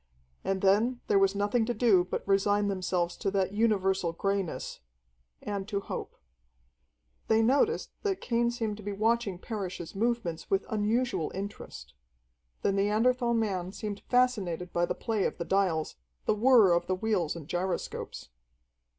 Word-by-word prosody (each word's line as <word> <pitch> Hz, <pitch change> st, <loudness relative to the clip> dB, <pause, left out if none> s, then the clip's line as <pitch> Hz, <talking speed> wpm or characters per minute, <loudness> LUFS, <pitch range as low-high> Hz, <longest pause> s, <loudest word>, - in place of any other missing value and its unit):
And 195 Hz, -1 st, -1 dB
then 220 Hz, +6 st, +3 dB
there 200 Hz, -, +3 dB
was 195 Hz, 0 st, +3 dB
nothing 205 Hz, +4 st, +1 dB
to 240 Hz, -, -1 dB
do 210 Hz, -5 st, +4 dB
but 185 Hz, -, -5 dB
resign 205 Hz, +1 st, +2 dB
themselves 180 Hz, -2 st, -1 dB
to 195 Hz, -, -1 dB
that 195 Hz, -1 st, 0 dB
universal 195 Hz, -5 st, +1 dB
greyness 195 Hz, 0 st, -2 dB, 0.6 s
and 200 Hz, -1 st, -3 dB
to 200 Hz, -1 st, -1 dB
hope. -, -, -6 dB, 1.1 s
They 220 Hz, 0 st, +4 dB
noticed 285 Hz, -, +2 dB
that 390 Hz, -3 st, -1 dB
Cain 235 Hz, 0 st, +1 dB
seemed 225 Hz, -3 st, -3 dB
to -, -, -10 dB
be 205 Hz, +1 st, -3 dB
watching 220 Hz, -2 st, +1 dB
Parrish's 185 Hz, -4 st, -5 dB
movements 220 Hz, -6 st, -1 dB
with 195 Hz, 0 st, +1 dB
unusual 220 Hz, -3 st, 0 dB
interest. 200 Hz, +2 st, -7 dB, 0.7 s
The -, -, +3 dB
Neanderthal 235 Hz, +5 st, +2 dB
man 190 Hz, -5 st, -1 dB
seemed 205 Hz, 0 st, -5 dB
fascinated 200 Hz, -9 st, +1 dB
by 175 Hz, 0 st, +1 dB
the -, -, -2 dB
play 220 Hz, -4 st, -1 dB
of -, -, -2 dB
the 170 Hz, -, -4 dB
dials, 180 Hz, -, 0 dB, 0.3 s
the -, -, +3 dB
whir 220 Hz, -4 st, +6 dB
of 170 Hz, -, +1 dB
the 185 Hz, -, +1 dB
wheels 185 Hz, -6 st, 0 dB
and 160 Hz, -4 st, -9 dB
gyroscopes. 175 Hz, -, -4 dB
200 Hz, 150 wpm, -29 LUFS, 185-225 Hz, 1.1 s, whir